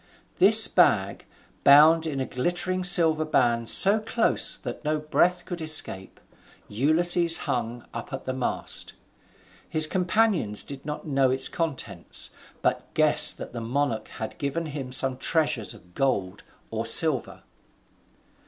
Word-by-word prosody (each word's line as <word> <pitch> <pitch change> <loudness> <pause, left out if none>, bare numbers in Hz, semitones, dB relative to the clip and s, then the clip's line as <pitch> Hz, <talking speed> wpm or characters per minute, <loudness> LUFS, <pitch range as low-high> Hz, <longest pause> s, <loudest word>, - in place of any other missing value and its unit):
This - - +10
bag, - - 0 0.4
bound 160 +3 +4
in 140 -3 -5
a 130 - -3
glittering 175 +8 -4
silver 165 -4 +2
band 120 -6 -1
so 200 +3 +5
close 225 +1 -1
that - - -9
no 155 0 -2
breath 175 +4 -1
could 175 -2 -8
escape, 155 -11 -2 0.5
Ulysses 165 +8 +1
hung 120 0 -5
up 115 - -9
at 135 - -8
the 130 - -4
mast. 130 -1 -4 0.8
His 155 0 +8
companions 180 - -1
did 140 +1 -12
not 150 - -7
know 135 -3 0
its 130 +1 +2
contents, 130 - -6 0.3
but - - -3
guessed - - +4
that - - -11
the 120 - -7
monarch 115 -2 -4
had 110 - -10
given 140 +4 -4
to 155 - -9
him 135 -3 -8
some 130 0 +1
treasures 140 -6 -2
of 90 0 -21
gold 100 -8 -3 0.3
or 110 0 -4
silver. 130 +3 0
145 Hz, 140 wpm, -23 LUFS, 120-165 Hz, 0.8 s, This